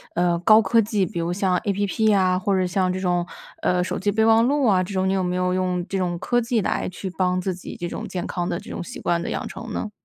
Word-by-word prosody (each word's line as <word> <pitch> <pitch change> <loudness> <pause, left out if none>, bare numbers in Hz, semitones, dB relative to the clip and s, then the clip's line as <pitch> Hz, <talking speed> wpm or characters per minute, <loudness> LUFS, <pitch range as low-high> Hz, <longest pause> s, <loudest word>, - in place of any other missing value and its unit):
呃， 175 0 +2
高 215 +5 +6
科 220 +3 +3
技， 210 -2 0
比 170 0 -5
如 170 +1 -1
像 185 -1 +1
App 205 +2 +1
啊， 185 -1 +2
或 195 +1 0
者 185 - +1
像 185 0 0
这 185 - -4
种， 175 -1 0 0.3
呃， 180 0 +1
手 - - -3
机 205 +2 0
备 220 +1 +2
忘 225 +1 +5
录 285 0 +2
啊 195 -5 +4
这 185 +2 -5
种？ 190 0 +1
你 - - +1
有 190 -1 +1
没 180 0 -1
有 180 0 0
用 180 -1 -1
这 195 - -1
种 175 -2 -1
科 240 - +1
技 235 -2 0
来 - - -1
去 185 +1 -6
帮 185 -1 +1
自 185 +1 -2
己 180 - -9
这 175 - -4
种 - - -5
健 180 -2 -4
康 175 -1 -3
的 - - -1
这 - - -10
种 - - -5
习 175 - -8
惯 170 -1 0
的 - - -4
养 - - -3
成 230 -1 -8
呢？ 215 - -3
185 Hz, 310 characters per minute, -23 LUFS, 180-205 Hz, 0.3 s, 高